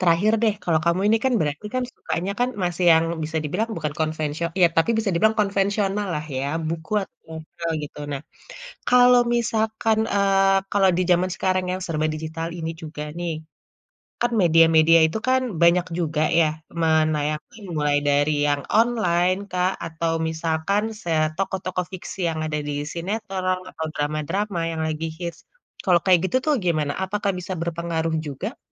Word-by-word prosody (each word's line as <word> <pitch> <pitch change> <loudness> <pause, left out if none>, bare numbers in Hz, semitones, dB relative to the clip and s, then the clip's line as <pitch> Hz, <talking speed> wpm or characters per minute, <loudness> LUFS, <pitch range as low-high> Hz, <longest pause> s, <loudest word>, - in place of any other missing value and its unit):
Terakhir 180 +4 +3
deh, 220 -3 +3
kalau 160 -3 +1
kamu 170 +2 +2
ini 220 - +5
kan 260 - +2
berarti 150 +5 -2
kan 255 - +1
sukanya 185 +4 -3
kan 245 - +3 0.2
masih 175 0 -1
yang 160 0 +4 0.2
bisa 160 +1 -4
dibilang 180 +10 -1
bukan 150 - -3
konvensio 155 +1 -1 0.2
ya, 175 - +8
tapi 165 +7 +3
bisa 220 -2 0
dibilang 220 +6 +2
konvensionallah 195 -4 0
ya, 135 - -2 0.2
buku 160 +2 -5
atau - - -13
jurnal 160 +1 -6
gitu. 150 - -8
Nah, 140 - -3 0.7
kalau 250 0 +6
misalkan 220 -1 0 0.2
eee, 195 -1 +4
kalau 195 -2 +4
di - - +2
zaman 180 +1 +3
sekarang 185 -1 0
yang 185 - -2
serba 155 -4 -2
digital 160 +1 -4
ini 160 0 -3
juga 155 -1 -6 0.2
nih, 175 -1 -2 0.9
kan 240 0 +2
media-media 165 -1 +6
itu 160 - -3
kan 260 0 +3 0.2
banyak 170 +1 +5
juga 155 -2 0 0.2
ya 165 - +5 0.3
menayangkan 155 +5 0
mulai 150 -1 +2
dari 145 +1 +3 0.2
yang 145 -1 +1
online, 185 -6 +2
Kak, 180 +1 +1
atau 165 0 -2
misalkan 160 +5 0 0.2
se 170 - -4 0.2
tokoh-tokoh 185 -1 -2
fiksi 185 +1 -7
yang 160 - -4
ada 150 -1 -2
di 145 0 -4 0.2
sinetron 185 0 -2
atau 160 - -5
drama-drama 165 +7 -2
yang 160 -1 -3
lagi 155 +1 -3
hits, 170 -3 -5 0.4
kalau 180 -2 +4
kayak 185 -2 +5
gitu 255 - +3
tuh 305 - +3
gimana? 155 -4 +1
Apakah 200 +1 -1
bisa 185 +1 -5
berpengaruh 165 -1 -2
juga? 165 - -5
170 Hz, 160 wpm, -23 LUFS, 160-195 Hz, 0.9 s, ya